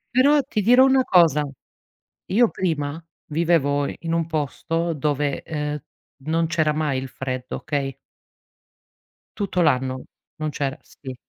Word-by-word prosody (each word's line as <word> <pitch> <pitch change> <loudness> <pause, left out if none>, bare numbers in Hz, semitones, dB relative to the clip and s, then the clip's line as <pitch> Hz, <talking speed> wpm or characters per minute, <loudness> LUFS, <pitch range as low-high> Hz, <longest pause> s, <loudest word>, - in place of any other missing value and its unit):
Però 285 +3 +5
ti 215 -5 -2
dirò 245 +5 +6
una 265 -1 +4
cosa: 155 -6 +4 0.8
io 230 +4 +3
prima 160 -3 -2 0.3
vivevo 150 -3 +2
in - - -5
in 165 0 -3
un 165 -1 +1
posto 165 +2 -2
dove, 145 -1 -1
uhm, 150 -1 -3 0.4
non 165 +1 +1
c'era 155 -2 +1
mai 150 -3 0
il 130 - -5
freddo, 130 -1 -5
okay? 140 -3 -3 1.4
Tutto 190 -3 0
l'anno, 130 -4 +1 0.3
non 155 0 -3
c'era, 140 0 -3
sì. 130 -2 -10
155 Hz, 135 wpm, -23 LUFS, 145-170 Hz, 1.4 s, dirò